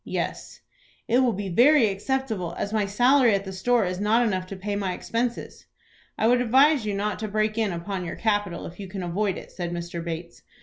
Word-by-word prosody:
"Yes." - - -4 0.5
"It 240 +2 +3
will 255 -2 +3
be 200 0 -4
very 245 - +5
acceptable, 205 -4 -2
as 205 - -3
my 210 -2 +1
salary 245 +2 +4
at 200 0 -3
the 190 - -6
store 230 +3 +2
is 180 0 -3
not 220 +4 +3
enough 185 -4 -1
to 195 - -7
pay 200 +2 -4
my 195 -2 -1
expenses." 235 +5 -4 0.5
"I - - +1
would 245 +1 +4
advise 265 +1 +4
you 205 - -1
not 205 +1 -2
to 215 - -3
break 215 +1 0
in 220 -3 0
upon 180 +2 -4
your 170 - -5
capital 205 -5 -1
if 175 - -10
you 195 - -6
can 190 0 -6
avoid 190 +3 -1
it," - - -10
said 175 -2 -5
Mr. 170 0 -5
Bates. 170 0 -6
205 Hz, 215 wpm, -25 LUFS, 185-230 Hz, 0.5 s, very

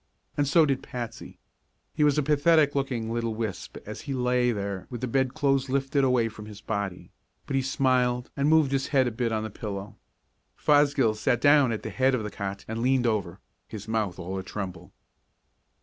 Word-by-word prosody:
And 145 -1 +1
so 160 +3 +5
did 135 -2 0
Patsy. 120 -3 -7 0.6
He 150 - +1
was 145 -1 +3
a 150 - +2
pathetic 150 0 +4
looking 125 -5 -2
little 115 -1 -2
wisp 110 -4 -5
as 105 0 -7
he 140 -2 -4
lay 125 -1 +2
there 100 -3 -4
with 120 -3 -6
the 130 - -1
bedclothes 135 +1 +1
lifted 135 +1 +1
away 125 -3 +3
from 105 -1 -9
his 105 -1 -10
body, 100 -4 -4 0.3
but - - -3
he 135 - +3
smiled 130 -2 +1
and 140 +1 +1
moved 155 -3 +4
his 135 -1 0
head 135 -3 +3
a - - -1
bit 115 +1 -1
on 110 -1 -1
the 110 - -5
pillow. 100 -1 -6 0.6
Fosgill 145 -6 +3
sat 110 +2 0
down 145 -3 +5
at 110 - -3
the - - -5
head 130 0 +2
of 115 - -2
the 105 - -5
cot 100 0 -5
and 110 +1 -4
leaned 130 0 +2
over, 100 -5 -1 0.3
his 110 -2 -8
mouth 110 -5 -1
all 95 +2 -4
atremble. 95 -2 -6
125 Hz, 195 wpm, -27 LUFS, 110-135 Hz, 0.6 s, so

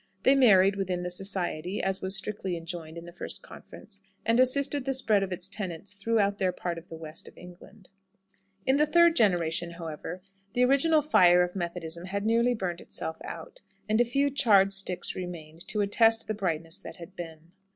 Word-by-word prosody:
They 265 - +6
married 200 -7 +5
within 185 -2 -2
the 180 - -4
"society" 180 -1 -2
(as 190 +1 -1
was 190 +1 +1
strictly 195 -3 -3
enjoined 165 -1 -7
at 170 - -8
the 175 - -10
first 175 - -7
conference), - - -12 0.2
and 230 +1 +3
assisted 280 +2 +3
the 270 -1 -1
spread 220 -6 +2
of 195 -1 -3
its 180 0 -2
tenets 195 -1 -5
throughout 205 -1 0
their 185 -1 +2
part 175 -2 -4
of 170 - -19
the 165 - -9
West 160 0 -6
of - - -15
England. 180 +3 -14 0.8
In 265 +1 +3
the 300 +1 +3
third 340 +1 +5
generation, 175 - +1
however, 170 +2 -7 0.3
the 250 +1 +3
original 295 +4 +3
fire 180 -11 +5
of 180 +1 -4
Methodism 170 -1 -5
had 200 +2 -3
nearly 235 +2 +3
burnt 180 -5 -4
itself 160 - -5
out, - - -8 0.3
and 215 +2 +3
a - - +6
few 275 +4 +1
charred 200 -7 +4
sticks 190 -2 -2
remained 170 -3 -8
to 210 - 0
attest 225 +2 +3
the 215 - -1
brightness 170 -3 -2
that - - -10
had 175 +2 -12
been. 165 -1 -9
190 Hz, 190 wpm, -28 LUFS, 175-225 Hz, 0.8 s, They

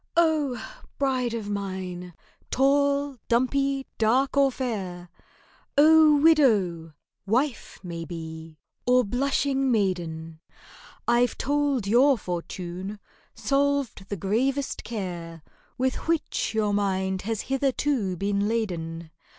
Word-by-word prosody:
Oh! 310 -6 +2 0.4
bride 255 -4 0
of 220 -3 -5
mine—tall, 205 - -1
dumpy, 270 +3 +1
dark, 250 +6 +2
or 275 -1 +4
fair! 190 -9 -4 0.7
Oh! 310 0 +7
widow—wife, 220 - +1
maybe, 165 -2 -7 0.3
or 250 0 +5
blushing 270 +3 0
maiden, 165 -6 -1 0.7
I've 240 0 +2
told 285 -5 0
your 255 +6 +4
fortune; 180 +1 -5 0.4
solved 280 -7 0
the 200 - -3
gravest 260 - -1
care 175 -7 -6 0.3
With 260 +3 -1
which 330 -8 -1
your 210 -2 +1
mind 190 -2 0
has 220 0 -2
hitherto 265 -7 0
been 200 +2 0
laden. 170 -7 -3
225 Hz, 95 wpm, -26 LUFS, 185-275 Hz, 0.7 s, Oh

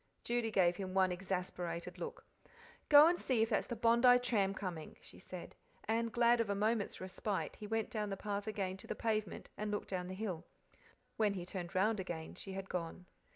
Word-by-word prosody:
Judy 240 -1 0
gave 180 -4 +3
him 190 -1 -5
one 190 -1 +4
exasperated 180 -2 -3
look. 480 0 -6 0.6
"Go 290 0 +10
and 345 +2 +3
see 240 -4 +2
if 225 - 0
that's - - +1
the 240 - -3
Bondi 235 +2 +6
tram 210 -6 +1
coming," 175 -6 -5
she - - -12
said; 180 -2 -8 0.3
and 230 +1 0
glad 235 +1 +4
of 220 - -2
a 200 - +1
moment's 215 +1 0
respite, 190 +2 -3
he 210 - -7
went 225 +2 -1
down 210 -3 -2
the 195 - -3
path 205 +1 -3
again 195 -3 -2
to - - -12
the - - -3
pavement 215 -4 -2
and 210 0 -2
looked 205 0 -3
down 180 -2 -2
the 185 - -5
hill. 185 -5 -3 0.7
When 210 -2 +2
he 175 -2 -4
turned 180 0 -6
round 210 +3 +3
again 170 -4 -5
she 195 - -8
had 195 0 -5
gone. 180 0 -4
200 Hz, 200 wpm, -36 LUFS, 185-225 Hz, 0.7 s, Go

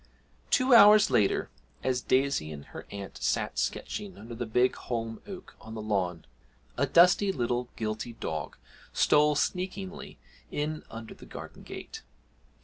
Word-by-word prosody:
Two 255 0 +4
hours 210 - +8
later, 110 -6 +2 0.3
as 125 -1 0
Daisy 130 - +1
and 70 -2 -8
her - - -8
aunt 100 -1 -8
sat - - 0
sketching 200 -3 -3
under 115 +3 -9
the 120 0 -4
big 125 +3 +2
holm 115 -2 -4
oak 190 -3 -9
on 110 +1 -9
the 110 - -5
lawn, 90 -6 -1 0.5
a - - +1
dusty 180 +3 +5
little 120 -4 -1
guilty 110 +1 -3
dog 80 -9 -5 0.4
stole 150 0 +4
sneakingly 185 +5 -3 0.3
in 155 +1 -2
under 115 0 -8
the - - -14
garden - - -9
gate. - - -8
125 Hz, 140 wpm, -29 LUFS, 110-180 Hz, 0.5 s, hours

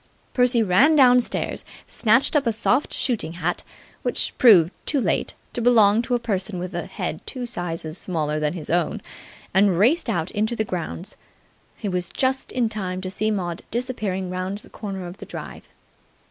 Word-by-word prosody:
Percy 245 -2 +4
ran 240 - +4
downstairs, 250 -3 +3 0.2
snatched 245 +7 +2
up 285 -4 +2
a - - +3
soft 245 +5 +1
shooting 230 -10 -1
hat, 175 0 -2 0.4
which - - 0
proved, 190 -9 +7 0.2
too 290 - +3
late, - - -1 0.2
to 240 - -2
belong 225 -3 +5
to 245 +1 -1
a - - 0
person 205 -4 -2
with 180 +1 -5
a 175 -2 -4
head 155 - -4
two 255 -2 -4
sizes 165 -6 -4
smaller 155 -4 -2
than 150 0 0
his 165 -4 -6
own; 170 -2 0 0.5
and 190 -2 +4
raced 260 - +3
out 170 0 -1
into 220 +3 -1
the 220 - -1
grounds. 180 +1 -5 0.6
He 215 - -5
was 180 -2 -2
just 265 0 -1
in 245 -2 +1
time 190 -4 -4
to 185 0 -4
see 215 +3 -1
Maud 180 -5 -2
disappearing 210 -7 -3
round 185 +2 -3
the 210 - -15
corner 195 -4 -6
of 175 +2 -8
the - - -9
drive. - - -8
200 Hz, 175 wpm, -23 LUFS, 180-240 Hz, 0.6 s, proved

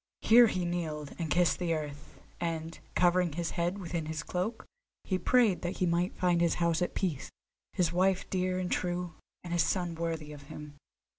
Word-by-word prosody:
Here 235 +1 +7
he 180 -4 -1
kneeled, 160 -4 -3
and 165 -2 -2
kissed 175 +1 +3
the 170 -2 0
earth, 150 -1 -7 0.2
and, 165 -1 -3 0.2
covering 180 -2 +3
his 170 +1 -2
head 175 +3 -1
within 170 -4 -4
his 160 0 -3
cloak, 185 +8 -3 0.4
he 185 -2 -1
prayed 230 -6 +3
that 175 - -3
he 185 - +1
might 175 +1 0
find 175 -2 +2
his 170 -1 +3
house 170 0 +1
at 180 - -1
peace, 165 -8 -2 0.4
his 175 -3 +1
wife 185 +1 +2
dear 185 -1 0
and 185 -1 -2
true, 175 -1 -1 0.3
and 175 -1 -5
his 175 - +3
son 175 +2 0
worthy 160 -2 -3
of 145 - -10
him. 150 -1 -8
175 Hz, 190 wpm, -31 LUFS, 160-180 Hz, 0.4 s, Here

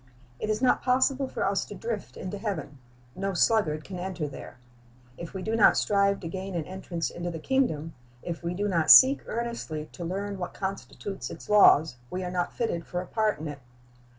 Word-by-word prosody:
It 215 - -3
is 215 +3 -1
not 255 - +4
possible 260 +2 +2
for - - -2
us - - +1
to - - -9
drift 475 +1 -5
into 190 +2 -5
heaven. 160 - -4 0.4
No 195 0 -2
sluggard 165 -7 +2
can 185 +1 -7
enter 180 -4 -3
there. 135 - -10 0.6
If 170 +5 -9
we 190 - -4
do 220 +3 -1
not 220 - +6
strive 200 -1 +2
to 170 - -5
gain 190 +2 -5
an 165 -3 -2
entrance 180 -3 -4
into 175 0 -4
the 165 - -5
kingdom, 165 - 0 0.3
if 170 -1 -5
we 170 +1 -3
do 205 +2 -1
not 165 -5 +1
seek 270 +2 +9
earnestly 230 -10 -4
to 175 - -8
learn 195 +3 -4
what 180 - -5
constitutes 195 0 -5
its - - -10
laws, 160 -9 +6
we 185 +1 -4
are 180 - -4
not 180 -1 -1
fitted 225 -8 -2
for 175 - -4
a 180 - -5
part 215 +2 0
in 155 - -6
it. 145 -1 -7
190 Hz, 205 wpm, -27 LUFS, 170-210 Hz, 0.6 s, seek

